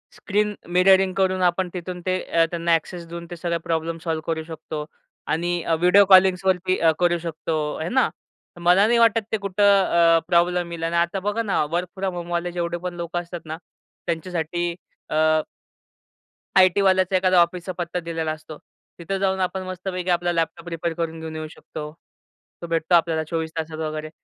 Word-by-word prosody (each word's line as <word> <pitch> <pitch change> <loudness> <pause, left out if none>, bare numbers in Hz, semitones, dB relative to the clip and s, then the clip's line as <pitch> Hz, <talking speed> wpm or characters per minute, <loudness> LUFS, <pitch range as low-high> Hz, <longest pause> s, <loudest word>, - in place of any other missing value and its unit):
Screen 210 0 0 0.2
mirroring 190 +1 +5
करून, 185 -1 +1
आपण 180 +1 +1
तिथून 180 0 -6
ते 185 0 +1 0.3
त्यांना 170 -1 +2
एक्सेस 170 +1 -5
देऊन, 170 0 -7
ते - - -4
सगळं 170 0 -2
प्रॉब्लेम 165 0 -2
सॉल्व्ह 160 -2 -2
करू 160 -1 -1
शकतो 155 -2 -6 0.4
आणि 175 +1 -1 0.2
व्हिडिओ 180 +4 +6
कॉलिंग्सवरती 185 -1 +4
अ, 165 -1 +5
करू 175 -1 +3
शकतो, 165 -1 -4 0.2
आहे 160 +2 -3
ना? 260 - +3 0.5
तर 175 - -13
मला 180 +4 +5
नाही 235 - +3
वाटत, 225 -1 +4
ते 220 - +1
कुठं 200 0 -1 0.5
अ, - - +3
प्रॉब्लेम 175 0 +2
येईल. 165 -1 -6
आणि 165 +1 -1
आता 170 +3 +1
बघा 205 +4 -1
ना, 195 -7 +1
वर्क 175 +1 -1
फ्रॉम 190 -1 -2
होमवाले 175 0 -3
जेवढे 175 0 -2
पण 180 - -3
लोकं 170 0 -3
असतात 170 0 -8
ना, 155 +1 -5 0.5
त्यांच्यासाठी 170 0 -2 0.4
अ. 155 0 +3 1.2
आयटीवाल्यांचं 185 0 +4
एखादा 185 -1 +4
ऑफिसचा 175 +2 -1
पत्ता 175 0 -3
दिलेला 165 -2 -3
असतो, 155 -1 -9 0.4
तिथं 195 +3 -3
जाऊन 190 -1 0
आपण 185 +1 -1
मस्तपैकी 185 0 -4
आपला 175 0 +1
लॅपटॉप 165 0 -2
रिपेअर 165 0 -3
करून 165 -1 -4
घेऊन 160 0 -7
येऊ 155 0 -5
शकतो. 150 -1 -8 0.7
तो 170 - -5
भेटतो 165 +1 +2
आपल्याला 165 -1 +2
24 160 0 -3
तासात 160 0 -4
वगैरे. 155 0 -4
175 Hz, 170 wpm, -23 LUFS, 165-185 Hz, 1.2 s, व्हिडिओ